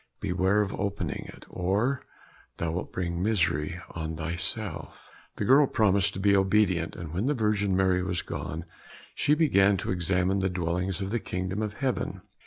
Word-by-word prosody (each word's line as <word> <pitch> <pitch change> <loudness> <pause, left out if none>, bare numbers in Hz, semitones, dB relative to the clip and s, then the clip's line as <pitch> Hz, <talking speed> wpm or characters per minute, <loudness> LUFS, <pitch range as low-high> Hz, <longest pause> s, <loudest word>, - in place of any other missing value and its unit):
Beware 95 +1 +2
of 100 - -4
opening 100 -4 -3
it, - - -15
or 105 +9 0 0.6
thou 85 -1 -1
wilt 90 +3 -4
bring 85 -1 -2
misery 85 -6 +1
on 80 -1 -4
thyself." 85 +2 -5 0.2
The - - -2
girl 140 +3 +6
promised 100 -5 +2
to - - -4
be 100 +1 +4
obedient, 95 -2 +2
and 80 -2 -7
when 95 +8 0
the 145 - +2
Virgin 105 -4 +1
Mary 95 -1 +3
was 90 -1 0
gone, 80 +2 -5 0.5
she 150 - +2
began 100 -11 +4
to - - -3
examine 90 +1 +1
the 95 0 +1
dwellings 90 +2 -2
of 95 0 -3
the 120 - 0
kingdom 95 +1 -3
of 105 -1 -2
heaven. 130 +2 -2
95 Hz, 170 wpm, -28 LUFS, 90-105 Hz, 0.6 s, girl